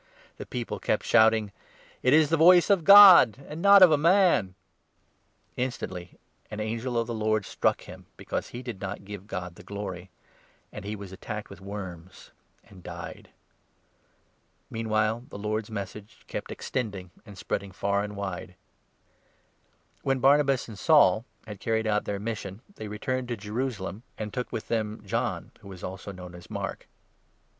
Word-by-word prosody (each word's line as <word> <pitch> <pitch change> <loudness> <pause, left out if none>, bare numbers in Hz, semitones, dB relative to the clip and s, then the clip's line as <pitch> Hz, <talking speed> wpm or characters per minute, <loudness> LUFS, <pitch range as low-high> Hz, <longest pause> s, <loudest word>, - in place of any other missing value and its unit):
The - - -8
people 120 -2 -4
kept - - -1
shouting: 110 -2 +4 0.3
" - - -27
It 125 - +3
is 155 0 +5
the - - +5
voice 175 +4 +6
of 190 -4 +3
God, 190 - +9
22 140 - -15
and 155 +2 -6
not 200 0 +8
of 180 - +8
a 150 - +3
man! 170 - +3 0.5
" - - -42
Instantly 90 -8 -7 0.3
an 105 - -6
angel 115 +3 -3
of 115 - +1
the 120 - -5
Lord 110 -2 0
struck - - 0
him, - - -12
because - - -4
he 120 +1 -8
did 115 -6 -7
not 95 +1 -4
23 - - -18
give 100 -1 -9
God 90 -3 -5
the - - -15
glory; 95 -3 -6 0.6
and - - -8
he 105 +1 -4
was 100 -2 -9
attacked 105 +2 -7
with 100 - -12
worms, 95 -3 -9 0.4
and 95 -2 -15
died. 85 -1 -9 1.4
Meanwhile 110 +1 -1
the - - -8
Lord's 105 +1 -3
Message 105 +1 -8
kept - - -6
extending, 100 -8 -4
and 100 -4 -13
spread - - -2
24 - - -11
ing 100 - -12
far 100 0 +1
and 105 0 -6
wide. 95 -2 -6 1.5
When 135 -1 0
Barnabas 135 0 +3
and 110 -4 -10
Saul 115 - +4 0.2
had 105 -3 -9
carried 110 -1 -1
out 105 -1 0
their 100 - -2
mission, 105 -3 -5 0.2
25 - - -43
they 110 - -6
returned 125 +5 -3
to 120 -1 -3
Jerusalem, 105 -1 -4 0.2
and 105 -1 -5
took 125 - -4
with 110 - -5
them 110 -2 -2
John, - - -2
who 100 - -15
was 95 -2 -10
also 95 +2 -6
known 90 -2 -10
as 90 0 -13
Mark. - - -5
110 Hz, 175 wpm, -27 LUFS, 100-125 Hz, 1.5 s, God